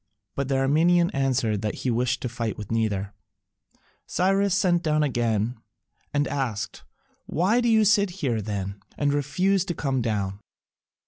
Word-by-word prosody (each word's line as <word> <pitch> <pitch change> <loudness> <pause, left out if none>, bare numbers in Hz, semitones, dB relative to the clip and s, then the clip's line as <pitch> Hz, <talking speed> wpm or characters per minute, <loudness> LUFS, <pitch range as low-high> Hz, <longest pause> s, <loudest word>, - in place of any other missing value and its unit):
But 140 -1 -2
the 135 - 0
Armenian 165 +6 +3
answered 130 -6 0
that 105 - -2
he 125 - +2
wished 125 +2 0
to - - 0
fight 115 -2 -3
with 105 0 -7
neither. 105 -3 -1 0.9
Cyrus 195 +1 +2
sent 175 -4 +2
again 120 -7 +1 0.5
and 145 -1 +1
asked, 130 -7 -3 0.4
"Why 200 +9 +2
do 240 - +2
you 220 -1 +5
sit 200 -3 +2
there, 120 - 0
then, 100 -1 -4 0.2
and 145 -1 +1
refuse 180 +7 +1
to 175 -3 -3
come 135 -3 -1
down?" 100 -4 -2
135 Hz, 145 wpm, -25 LUFS, 110-175 Hz, 0.9 s, you